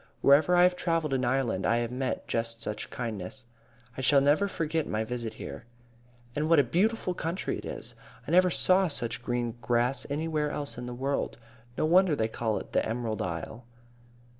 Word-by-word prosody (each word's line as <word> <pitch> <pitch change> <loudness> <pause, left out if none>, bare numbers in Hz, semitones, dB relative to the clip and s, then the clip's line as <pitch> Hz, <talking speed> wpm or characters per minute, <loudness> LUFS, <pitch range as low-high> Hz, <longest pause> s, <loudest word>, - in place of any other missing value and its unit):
Wherever 150 +6 +5
I 175 - +6
have 180 0 +4
travelled 165 -5 0
in 130 -1 +1
Ireland 120 -6 0
I 115 - +3
have 120 0 -1
met 130 +1 -3
just 115 0 -2
such 105 -2 -4
kindness. 115 +1 -5 0.5
I - - -4
shall 140 +2 +5
never 145 +8 +3
forget 165 -4 -1
my 110 +1 -1
visit 115 -1 -4
here. 115 - -8 0.7
"And 150 +2 0
what 165 - +6
a 145 - +6
beautiful 185 - +1
country 170 +1 -3
it - - -9
is! - - -5 0.3
I - - -3
never 180 +1 +6
saw 185 +2 +3
such 120 -7 -3
green 120 -1 -2
grass 120 +3 +1
anywhere 150 0 -1
else 145 -1 -4
in 120 0 -6
the 125 - -5
world. 135 +3 -2 0.4
No - - +2
wonder 180 +1 +5
it - - -2
is 110 - +1
called 110 -2 -2
'The - - +3
Emerald 115 -1 -2
Isle.'" 90 +7 -5
135 Hz, 190 wpm, -29 LUFS, 120-160 Hz, 0.7 s, I